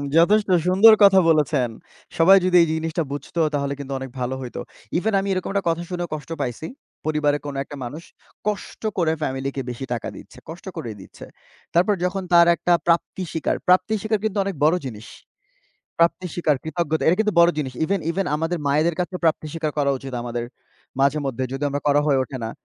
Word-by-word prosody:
যথেষ্ট 205 +5 +4 0.2
সুন্দর 205 +5 +7
কথা 195 -1 +7
বলেছেন। 150 -5 +2 0.5
সবাই 190 +4 +7
যদি 180 -1 +2
এই 165 - +3
জিনিসটা 160 0 -2
বুঝত 145 +4 -7 0.2
তাহলে 140 -1 -1
কিন্তু 140 -1 -5
অনেক 135 -1 -6
ভালো 125 +1 -2
হইত। 125 - -7 0.4
ইভেন 215 +4 0
আমি 195 - -3
এরকম 185 - -3
একটা 200 -1 0
কথা 170 +1 -1
শুনেও 175 -1 -3
কষ্ট 150 -1 -7
পাইছি। 125 +4 -4 0.4
পরিবারের 150 -1 +1
কোনো 140 -1 -5
একটা 145 - -10
মানুষ 155 +7 -7 0.4
কষ্ট 210 -1 -4 0.2
করে 165 -3 +2
ফ্যামিলিকে 135 0 -3
বেশি 125 +2 -5
টাকা 115 - -4
দিচ্ছে, - - -13
কষ্ট 170 +4 -9
করেই 115 -4 -6
দিচ্ছে। - - -12 0.5
তারপর 185 +5 +3
যখন 190 +1 -2
তার 170 0 +7
একটা 175 - +1
প্রাপ্তি 170 +2 +1
স্বীকার, 160 - -1
প্রাপ্তি 185 +4 +4
স্বীকার 215 -1 0
কিন্তু 215 -1 -1
অনেক 195 -3 -4
বড় 155 +3 +5
জিনিস। 115 -1 -8 0.9
প্রাপ্তি 170 +2 +2
স্বীকার, 155 -5 +1
কৃতজ্ঞতা 160 -1 -2
এটা 170 +3 +4
কিন্তু 210 -1 +1
বড় 170 - +6
জিনিস। 135 -4 -3
ইভেন 195 +2 0
ইভেন, 195 +1 -1
আমাদের 165 +2 -2
মায়েদের 155 +4 +2
কাছে 180 +1 -3
প্রাপ্তি 160 -1 +1
স্বীকার 160 -2 -2
করা 140 -1 +2
উচিত 135 0 -9
আমাদের 120 0 -4 0.6
মাঝেমধ্যে। 135 -2 0
যদিও 140 +2 -2
আমরা 145 +1 -3
করা 145 0 +4
হয়ে 140 -2 +3
ওঠে 130 - -6
না। 110 - -3
160 Hz, 190 wpm, -22 LUFS, 140-180 Hz, 0.9 s, সুন্দর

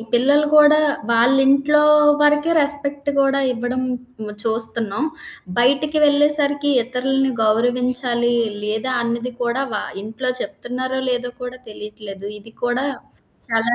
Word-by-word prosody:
ఈ - - -8
పిల్లలు 285 +5 +3
కూడా 300 0 +6 0.3
వాళ్ళింట్లో 270 +5 +3 0.4
వరకే 295 +2 +3
రెస్పెక్ట్ 285 0 -1
కూడా 275 0 +2
ఇవ్వడం 245 +2 -3 0.6
చూస్తున్నాం. 225 +1 0 0.5
బయటికి 280 +5 +2
వెళ్ళేసరికి 290 0 +2
ఇతరుల్ని 265 +2 -1
గౌరవించాలి, 245 +2 0 0.3
లేదా 220 +5 -2
అన్నది 235 +1 -3
కూడా 240 +3 -1
వ 210 - -2 0.3
ఇంట్లో 225 +4 -4
చెప్తున్నారో 255 +2 -4
లేదో 245 0 -2
కూడా 250 +1 -7
తెలీట్లేదు. 210 -2 -9
ఇది 225 +2 -15
కూడా 245 +3 -1 0.6
చాలా 225 +1 +1
255 Hz, 110 wpm, -19 LUFS, 235-280 Hz, 0.6 s, కూడా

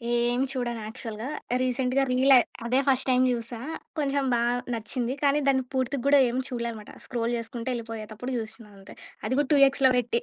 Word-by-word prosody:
ఏం 240 +1 +1
చూడను 240 -4 -3
యాక్చువల్‌గా. 225 +1 -6 0.3
రీసెంట్‌గా 255 +1 +1
రీలె. 260 +1 +6 0.3
అదే 250 +3 +2
ఫస్ట్ 265 -1 +2
టైమ్ 255 0 +4
జూసా. 235 -1 -4 0.4
కొంచెం 280 -1 0
బా 235 - +2 0.3
నచ్చింది. 235 +2 -2
కానీ 285 +1 +4
దాన్ని 265 -1 +3
పూర్తిగూడా 275 +2 +2
ఏం 245 - -3
చూడలే 235 -2 -3
అన్నమాట. 215 -2 -10
స్క్రోల్ 235 -1 -2
చేసుకుంట 230 +1 -6
ఎళ్ళిపోయేతప్పుడు 225 +1 -6
జుసినా 220 0 -7
అంతే. 195 - -13 0.3
అది - - -1
కూడా 290 - 0
2 285 - +5
ఎక్స్‌లో 270 -1 +3
పెట్టి. 235 -1 0
245 Hz, 165 wpm, -26 LUFS, 230-265 Hz, 0.4 s, రీలె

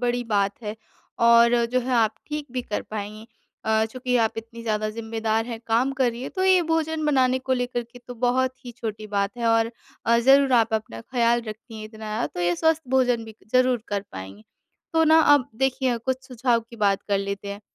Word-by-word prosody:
बड़ी 245 0 0
बात 200 -1 +2
है 210 0 -5 0.5
और 235 0 +6 0.2
जो 255 - +3
है 255 +1 -3
आप 220 -2 +3
ठीक 300 -1 -4
भी 255 -1 -2
कर 210 - -3
पाएँगी। 215 +1 -6 0.4
अ, 220 0 +2
चूँकि 250 +2 -2
आप 225 -2 +2
इतनी 230 +1 -9
ज़्यादा 215 -1 -1
ज़िम्मेदार 225 0 -2
हैं, 230 -2 -6
काम 235 +4 +2
कर 260 -2 +1
रही 235 +1 -8
हैं, - - -5
तो 375 -1 -1
यह 375 -1 +5
भोजन 320 -1 0
बनाने 260 -3 +3
को 260 0 -2
लेकर 245 -1 -1
के 245 - -12
तो 245 0 -10
बहुत 255 +2 0
ही 245 - -8
छोटी 215 -2 -5
बात 200 +1 -1
है 235 - -1
और 225 0 +3 0.4
अ, 235 0 +4
ज़रूर 270 +2 +5
आप 225 -2 +3
अपना 215 - -4
ख़याल 235 - +1
रखती 220 +2 -9
हैं 215 - -7
इतना 215 0 -12
ज़्यादा, 215 +1 -1
तो - - -7
ये 175 0 +2
स्वस्थ 320 0 +2
भोजन 250 -3 +2
भी 220 -1 -11 0.2
ज़रूर 255 -2 +3
कर 205 -1 -2
पाएँगी। 95 +3 -9 0.5
तो 325 0 +4
ना, 315 +1 +6
अब 290 -4 +4
देखिए 260 0 0
कुछ 260 +2 -3
सुझाव 245 -1 +1
की 235 - -11
बात 200 -3 +1
कर 200 -1 +2
लेते 200 0 -4
हैं। 200 0 -6
235 Hz, 215 wpm, -24 LUFS, 220-255 Hz, 0.5 s, और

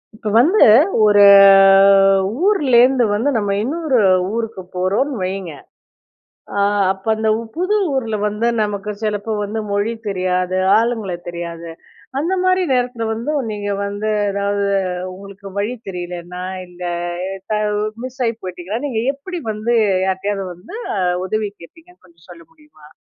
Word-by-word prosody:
இப்ப 215 0 -5
வந்து 365 - +5 0.4
ஒரு 205 -1 +5 1.2
ஊர்லேருந்து 260 - +4
வந்து 235 +7 0
நம்ம 205 -2 -1
இன்னொரு 290 0 0 0.3
ஊருக்கு 225 -3 -4
போறோம்ன்னு 205 +8 -1
வைங்க. 185 -3 -4 1.0
அ - - -2 0.3
அப்ப 190 0 -17
அந்த 220 0 -1
உ - - -5
புது 370 +5 0 0.2
ஊர்ல 230 -5 -1
வந்து 210 +2 -1 0.2
நமக்கு 205 0 -3
சிலப்ப 215 0 -2
வந்து 210 +2 -3
மொழி 205 +3 0 0.2
தெரியாது, 185 -1 -1 0.2
ஆளுங்கள 225 -4 -1 0.2
தெரியாது. 170 -1 -7 0.5
அந்த 335 +6 -1
மாரி 370 0 +2
நேரத்தில 245 -2 -1
வந்து 230 +7 -4 0.2
நீங்க 205 -1 -4
வந்து 205 +2 -3 0.2
எதாவது 200 0 -1 0.5
உங்களுக்கு 200 +1 -12
வழி 215 +5 -2
தெரியலன்னா 180 0 -7 0.2
இந்த 180 0 -11 0.5
எ - - -4 0.2
த - - +2 0.5
மிஸ் 260 +1 -10
ஆயி 230 -1 -1
போயிட்டிங்கன்னா, 185 +6 -5
நீங்க 230 -5 -2
எப்படி 345 +6 -7
வந்து 215 +3 -1 0.3
யார்ட்டயாவது 195 +1 -2
வந்து 180 - -12 0.2
அ - - 0 0.2
உதவி 215 +2 -2
கேட்பீங்கன்னு 335 - -17
கொஞ்சம் 170 -2 -24
சொல்ல 335 - -12
முடியுமா? 300 - -20
210 Hz, 135 wpm, -18 LUFS, 190-245 Hz, 1.2 s, வந்து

